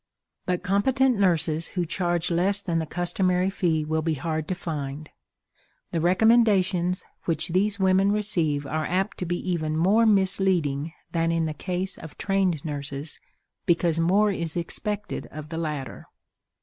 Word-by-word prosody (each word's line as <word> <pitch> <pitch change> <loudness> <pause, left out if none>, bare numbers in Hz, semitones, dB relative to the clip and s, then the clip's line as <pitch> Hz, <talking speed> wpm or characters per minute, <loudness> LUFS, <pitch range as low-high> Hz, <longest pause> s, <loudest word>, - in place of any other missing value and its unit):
But 180 -1 -1
competent 250 +5 +2
nurses 165 -4 +2
who 175 - +1
charge 175 0 -1
less 190 +4 +2
than 170 -4 -1
the 160 - -3
customary 180 +2 0
fee 165 -6 0
will 160 +1 0
be 160 0 0
hard 155 +1 -3
to 185 - -1
find. 150 -3 -5 0.8
The 165 - -1
recommendations 185 -2 +3 0.2
which 160 -1 0
these 200 +4 +2
women 190 +1 +3
receive 170 -9 +1
are 155 +2 -2
apt 190 +4 -1
to 180 - -3
be 175 +1 -1
even 155 -3 -1
more 205 +7 +4
misleading 185 -7 +2 0.2
than 165 -1 +1
in 165 -1 +1
the 155 - -2
case 185 +4 -4
of 160 - -11
trained 190 -6 0
nurses, 145 0 -5 0.5
because 170 -1 +2
more 200 +5 +3
is 170 -5 -3
expected 210 +4 -4
of 155 0 -9
the 165 0 -4
latter. 150 -6 -5
175 Hz, 150 wpm, -25 LUFS, 160-195 Hz, 0.8 s, more